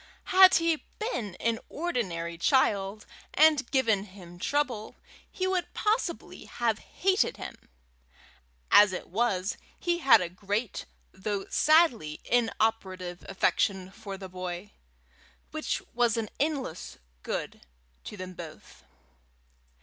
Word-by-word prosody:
Had 375 0 +9
he 330 -2 +2
been 235 - -3
an 230 +2 -1
ordinary 190 - -2
child, 200 +1 +1 0.3
and 305 -2 +5
given 225 -7 +2
him 180 -3 -13
trouble, 255 -4 -1 0.4
he 370 - -2
would 375 -1 -1
possibly 420 -5 -1
have 230 -3 -1
hated 385 +2 0
him; - - -9 1.0
as 205 -2 +7
it 180 - -6
was, 195 -2 0 0.2
he 345 -1 0
had 270 -8 +7
a 180 - -2
great 200 +5 -3 0.3
though 195 +1 -3
sadly 295 - +3
inoperative 215 -6 0
affection 190 0 +1
for 200 -2 -8
the 190 0 -8
boy, 185 +2 -6 0.8
which 310 0 -2
was 235 -1 +2
an 220 -2 -2
endless 275 - -2 0.2
good - - -4 0.4
to 210 - -8
them 185 -1 -7
both. 170 -3 -11
215 Hz, 115 wpm, -28 LUFS, 185-290 Hz, 1.0 s, Had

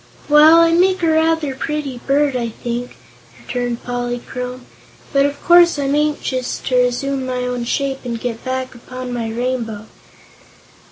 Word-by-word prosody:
"Well, 305 +2 +7
I 335 0 +4
make 370 +2 +3
a 330 - +3
rather 320 -2 +1
pretty 280 -2 -4
bird, 280 0 +2
I 235 -2 -1
think," 240 +2 -5 0.4
returned 245 -1 -4
Polychrome, 245 +1 -5 0.5
"but 275 0 +4
of 285 0 -6
course 345 -2 +6
I'm 280 -1 0
anxious 290 -4 -1
to 255 - 0
resume 250 +2 +1
my 255 -1 -3
own 250 -1 -3
shape 270 +2 -1
and 235 -2 -4
get 230 -1 -4
back 260 0 -3
upon 255 +1 -8
my 230 -2 -3
rainbow." 230 -2 -3
255 Hz, 150 wpm, -18 LUFS, 245-295 Hz, 0.5 s, Well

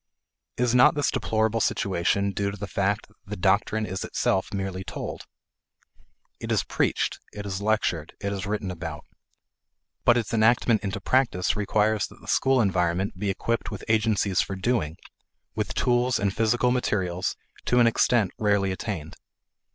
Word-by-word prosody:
Is 125 -1 +1
not 125 +3 +6
this 145 -2 +1
deplorable 110 0 0
situation 100 +1 +1
due 100 0 -1
to 100 - -7
the 100 - -5
fact 100 +3 -1
that - - -27
the 105 +1 -6
doctrine 100 +3 +1
is 95 0 -4
itself 95 +2 0
merely 95 -2 -3
told? - - -6 1.1
It - - -5
is - - +2
preached; - - -1
it 105 0 -7
is 95 -1 -4
lectured; 100 -7 0
it 100 0 -2
is 95 -1 -4
written 105 -2 -2
about. 80 -4 -6 1.0
But 120 0 +5
its 115 -1 -2
enactment 115 0 +3
into 100 +1 -3
practice 115 -6 +1
requires 105 0 +1
that - - -17
the - - -16
school 135 -1 +3
environment 90 -1 0
be 100 0 -1
equipped 115 +4 -1
with 105 - -7
agencies 110 -4 +2
for 95 - -4
doing, 95 -6 -1 0.6
with - - -3
tools 125 0 +2
and 100 -1 -1
physical 120 +2 +2
materials, 95 -8 -1 0.3
to 125 - +2
an 120 - +6
extent 115 -3 +3
rarely 100 -2 +2
attained. 95 -5 -5
100 Hz, 160 wpm, -26 LUFS, 95-115 Hz, 1.1 s, not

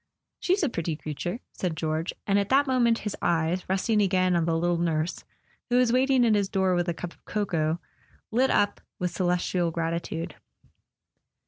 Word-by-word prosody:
"She's 370 +1 +1
a 305 - +2
pretty 165 -6 -2
creature," 165 - -5
said 175 -4 -3
George; 160 +2 -1
and 200 0 +3
at 200 - -1
that 275 +2 +4
moment 245 -4 +3
his 210 - -2
eyes, 170 +2 0
resting 210 +3 +2
again 185 -2 +2
on 170 -1 +2
the 165 -1 +1
little 175 0 +1
nurse, 165 0 -1 0.5
who 245 - +3
was 250 -2 +3
waiting 260 -1 +4
at 225 - +4
his 200 -2 +1
door 190 -2 +2
with 175 0 +1
a - - 0
cup 175 0 -6
of - - -29
cocoa, 170 -6 -1 0.5
lit 255 +4 +3
up 205 0 +2 0.2
with 180 -1 -2
celestial 180 -1 0
gratitude. 165 0 -3
180 Hz, 180 wpm, -27 LUFS, 170-215 Hz, 0.5 s, that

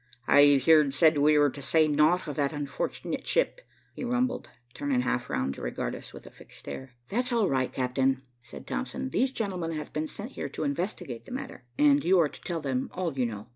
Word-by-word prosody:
"I've 145 -1 +6
heer'd 150 -3 +5
said 155 -1 +5
we 150 +1 +5
were 145 -1 +4
to 140 - -9
say 155 +3 +3
naught 155 +4 +3
of 145 - -4
that 140 0 +1
unfort'nit 145 -2 -4
ship," - - +1 0.3
he - - -7
rumbled, 250 +1 -1 0.2
turning 140 -3 0
half 125 -1 -1
round 65 +2 -1
to - - -10
regard - - -3
us - - -8
with - - -12
a - - -12
fixed - - -15
stare. 130 -2 -8
"That's 245 +4 0
all 230 -4 +2
right, 130 -1 0
Cap'n," 130 +1 0 0.2
said 125 - -11
Thompson. 260 +1 -4
"These 260 +1 +1
gentlemen 185 -9 -2
have 155 -1 -6
been 155 +1 -2
sent 215 - -8
here 140 - -5
to 140 - -5
investigate 140 - -3
the - - -11
matter, 265 - -7
and 145 -1 +5
you 185 +3 +4
are 155 -3 +3
to - - -13
tell 170 -2 -3
them 130 -3 -2
all 180 -4 -2
you 130 -3 0
know." 110 0 -8
150 Hz, 215 wpm, -28 LUFS, 135-185 Hz, 0.3 s, I've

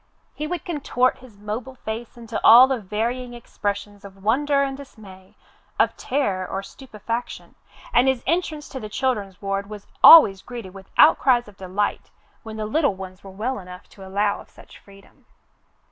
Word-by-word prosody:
He 305 - -5
would 350 0 -5
contort 270 -6 0
his 250 -5 -16
mobile 220 +5 -6
face 225 0 -7
into 230 -1 -6
all 240 +3 +9
the 265 -2 -2
varying 235 +5 -3
expressions 205 -3 -5
of 195 -1 -14
wonder 280 +6 +2
and 270 -1 -3
dismay, 200 -9 -14 0.4
of - - +2
terror 205 -9 -1
or 195 +1 -4
stupefaction, 230 +1 -7 0.4
and 260 - +4
his 265 -2 +1
entrance 315 -2 -2
to 265 - -7
the 215 -3 -8
children's 210 -6 -2
ward 195 0 -3
was 210 -1 -9 0.2
always 200 -13 +9
greeted 235 -7 -9
with 195 -1 -13
outcries 255 -6 +5
of 205 - -15
delight, 195 +2 -3 0.3
when 220 -1 -9
the 215 - -3
little 280 0 +1
ones 185 -1 -10
were 195 - -10
well 225 +7 -4
enough 180 -1 -12
to 195 - -14
allow 200 +2 -1
of - - -18
such - - -17
freedom. 195 0 -20
220 Hz, 170 wpm, -22 LUFS, 200-260 Hz, 0.4 s, all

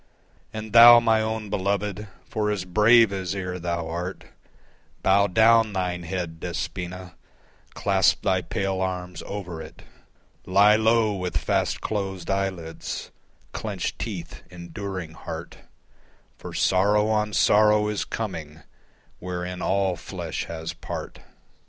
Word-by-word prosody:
And 110 -1 -7
Thou, 120 0 +10
my 115 -2 +2
own 110 -1 -3
beloved, 100 +1 -2 0.2
for 105 -1 -2
as 100 -3 -2
brave 110 +3 +5
as 95 -1 -3
ere 90 -2 -4
thou 85 -1 -3
art, 85 +3 -5 0.8
Bow 100 +1 +4
down 110 +2 +4
thine 90 -2 -2
head, 85 -2 -5
Despoina, 90 +1 -5 0.6
clasp 95 -1 +2
thy 95 -2 +2
pale 95 0 -2
arms 90 -2 -4
over 90 -5 -6
it, - - -12 0.6
Lie 100 +3 +6
low 110 0 +3
with 90 -2 -2
fast - - -1
closed 95 -4 -3
eyelids, 95 -4 -4 0.4
clenched - - -4
teeth, - - -6
enduring 90 0 -6
heart, 80 0 -8 0.8
For - - -8
sorrow 105 +3 +2
on 105 -1 0
sorrow 105 0 +4
is 105 -1 -1
coming 80 -8 -6 0.6
wherein 90 0 -5
all 95 -1 +1
flesh - - -5
has 80 -1 -6
part. - - -7
95 Hz, 120 wpm, -25 LUFS, 90-105 Hz, 0.8 s, Thou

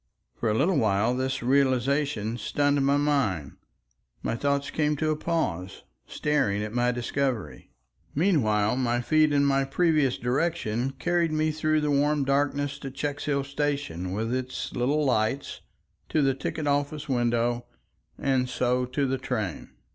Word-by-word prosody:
For 115 - -2
a 105 - +1
little 160 +7 +2
while 110 0 +2
this 130 +1 -2
realization 130 -2 +1
stunned 145 +5 +1
my 140 +1 +3
mind. 130 - 0 0.7
My - - -1
thoughts 140 +2 -1
came 150 -1 +1
to 155 +1 0
a - - +1
pause, 100 - -2 0.2
staring 135 -9 0
at 105 0 -5
my 120 0 +2
discovery. 125 0 -3 0.5
Meanwhile 125 - +2
my 120 -2 +1
feet 155 +3 +3
and 140 -1 +3
my 135 -1 +3
previous 150 -2 +2
direction 130 -2 -1
carried 175 -2 +1
me 155 0 +1
through 155 0 +1
the 150 -1 0
warm 145 0 +2
darkness 140 0 0
to 135 - -6
Checkshill 140 +1 -2
station 140 - -2
with 110 +5 -2
its 130 0 -3
little 145 +5 +1
lights, 125 +1 0 0.5
to 155 - +2
the 135 -1 +3
ticket 150 +3 -4
office 145 +1 -1
window, 120 -2 0 0.5
and 130 -2 +1
so 125 0 +1
to 130 +3 -1
the 135 0 -1
train. 115 - -3
135 Hz, 145 wpm, -26 LUFS, 120-145 Hz, 0.7 s, my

